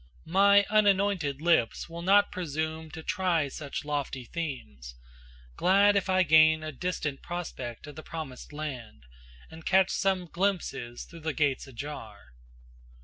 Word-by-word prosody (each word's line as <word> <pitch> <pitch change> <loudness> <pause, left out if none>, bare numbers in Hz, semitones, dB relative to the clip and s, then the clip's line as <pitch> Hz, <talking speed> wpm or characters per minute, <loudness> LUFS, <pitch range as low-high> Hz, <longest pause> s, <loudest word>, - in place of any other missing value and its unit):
My 200 +4 +5
unanointed 200 -8 +2
lips 170 -9 +2
will 170 0 -8
not 200 +3 +4
presume 160 -2 -3
To 160 +1 -9
try 175 -7 0
such 145 +1 -6
lofty 145 -3 -3
themes, 75 - -6 0.6
glad 200 - +4
if 200 -1 0
I 185 0 +4
gain 155 -1 +5
A 155 - -4
distant 150 -2 -3
prospect 155 -9 -6
of 150 -2 -10
the 155 - -8
promised 155 -6 -8
land, 135 - -7 0.5
And 160 0 -11
catch 190 +1 +3
some 190 -2 0
glimpses 170 -10 -2
through 170 - -12
the 160 -1 -3
gates 140 -2 0
ajar. 115 - -9
160 Hz, 140 wpm, -28 LUFS, 140-185 Hz, 0.6 s, My